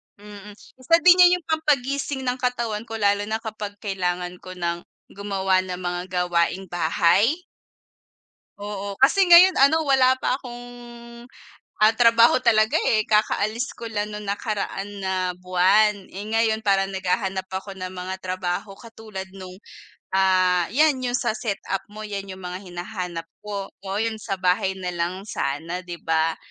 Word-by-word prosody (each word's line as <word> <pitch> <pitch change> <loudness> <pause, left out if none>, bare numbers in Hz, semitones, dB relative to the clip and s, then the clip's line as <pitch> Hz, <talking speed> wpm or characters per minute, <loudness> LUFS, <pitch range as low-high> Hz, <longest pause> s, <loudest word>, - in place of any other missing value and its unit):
Mm, 205 0 -12
isa 260 +9 0
din 360 0 +7
yun 355 0 +8
'yung - - -26
pampagising 280 -3 0
ng 250 0 -2
katawan 235 -3 -2
ko 225 - -6
lalo 205 -1 +1
na 220 +1 -3
kapag 210 -2 -6
kailangan 180 -2 -3
ko 185 0 -10
nang 170 0 -3 0.2
gumawa 195 -2 0
ng 185 -1 -4
mga 175 0 -2 0.3
gawaing-bahay? 175 - +1 1.2
Oo, 200 0 -6
kasi 335 +9 +5
ngayon 365 +2 +9
ano, 310 +4 +4
wala 260 -1 +4
pa 255 - 0
akong, 245 -2 -9 1.2
ah 220 +1 +6
trabaho 230 +1 +6
talaga 220 -3 +3
eh. 215 -1 +3
Kakaalis 215 +3 +1
ko 230 -1 -8
lang 210 0 -3
'nung 210 - -6
nakaraan 200 -1 -3
na 190 0 -1 0.2
buwan. 185 +3 +2
Eh 195 - -5
ngayon, 220 -1 +1
parang 195 -2 +2
naghahanap 190 0 -2
ako 190 +1 -6
ng 185 -1 -6
mga 185 0 -5
trabaho 185 +2 -4
katulad 220 -4 -9
'nung, 185 -1 -10 0.5
ah, 185 -2 +3
'yan 290 +2 +2
'yung 245 -1 -1
sa - - -1
setup 200 -3 -3
mo, 215 +1 -9
'yan 200 -1 -5
'yung 190 0 -9
mga 180 +1 -5
hinahanap 175 -1 -5 0.2
ko. 200 -2 -6
Oo, 195 0 -5
yun 220 0 -2
sa 195 - -3
bahay 185 +1 +1
na 180 -1 -4
lang 175 +3 -3
sana, 165 0 -3
'di 175 -1 -8
ba? 160 0 +1
200 Hz, 150 wpm, -23 LUFS, 185-225 Hz, 1.2 s, ngayon